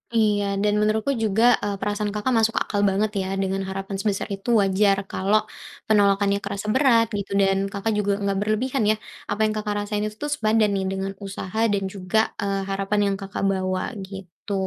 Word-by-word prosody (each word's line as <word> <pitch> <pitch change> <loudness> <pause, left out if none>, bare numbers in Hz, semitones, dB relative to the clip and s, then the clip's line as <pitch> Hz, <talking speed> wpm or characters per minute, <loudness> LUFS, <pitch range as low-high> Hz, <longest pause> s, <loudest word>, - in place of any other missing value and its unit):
Iya, 210 -2 +3 0.2
dan 210 0 +2
menurutku 215 +5 +1
juga, 220 +1 +2 0.2
eee, 205 -1 -1
perasaan 205 +1 -1
Kakak 210 +5 0
masuk 225 0 +2
akal 205 - -2
banget 205 +2 0
ya, 190 - -3 0.2
dengan 195 0 -1
harapan 195 +1 -4
sebesar 200 -1 -1
itu 195 +5 -8
wajar 195 +1 +3
kalau 200 +3 +2 0.5
penolakannya 200 -1 +3
kerasa 200 +1 -4
berat 255 -4 +5
gitu, 200 0 -5
dan 195 0 +3
Kakak 200 +2 -2
juga 200 0 +1
enggak 200 -1 -1
berlebihan 215 +4 0
ya. 215 - +2 0.4
Apa 215 +1 +1
yang 215 - +2
Kakak 210 -1 -2
rasain 210 0 -2
itu 210 - -8
tuh 295 - -2
sepadan 215 -2 +2
nih 190 -1 -1
dengan 195 0 -3
usaha 195 +2 -5
dan 195 -1 0
juga, 200 +3 0
eee, 195 -1 -1
harapan 195 +1 0
yang - - -1
Kakak 195 -1 -5
bawa, 185 -1 -1 0.2
gitu. 190 0 -8
205 Hz, 185 wpm, -23 LUFS, 195-215 Hz, 0.5 s, berat